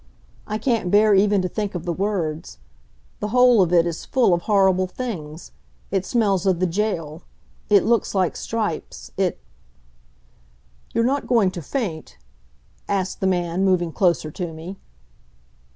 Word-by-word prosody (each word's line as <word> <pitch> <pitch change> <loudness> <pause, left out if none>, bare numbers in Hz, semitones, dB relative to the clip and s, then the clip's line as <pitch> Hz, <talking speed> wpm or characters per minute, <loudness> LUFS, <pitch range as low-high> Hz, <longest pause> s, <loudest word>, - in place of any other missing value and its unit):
I 215 - -2
can't 225 -5 0
bear 210 +2 +5
even 200 0 +3
to - - 0
think 205 0 -4
of 175 0 -5
the 175 - -1
words. 170 -4 -3 0.6
The 210 - -2
whole 250 -1 +5
of 175 -2 +1
it 170 -1 +4
is 170 -1 -4
full 245 -8 +2
of 175 - +1
horrible 190 -2 +2
things 175 -8 -7 0.4
it 190 -1 -1
smells 200 -5 +1
of 185 -3 +2
the 185 - +2
jail 170 -4 -2 0.5
it 205 -2 +5
looks 230 -3 +1
like 185 -3 +1
stripes 215 -8 -4
it... - - -1 1.5
"You're 230 - +1
not 275 +4 0
going 225 -7 +3
to 175 - -7
faint?" 160 - -4 0.7
asked 190 -2 -1
the 190 - 0
man, 175 0 0
moving 180 -3 +2
closer 170 -3 +1
to 175 +1 -5
me. 165 +5 -9
190 Hz, 150 wpm, -22 LUFS, 175-210 Hz, 1.5 s, bear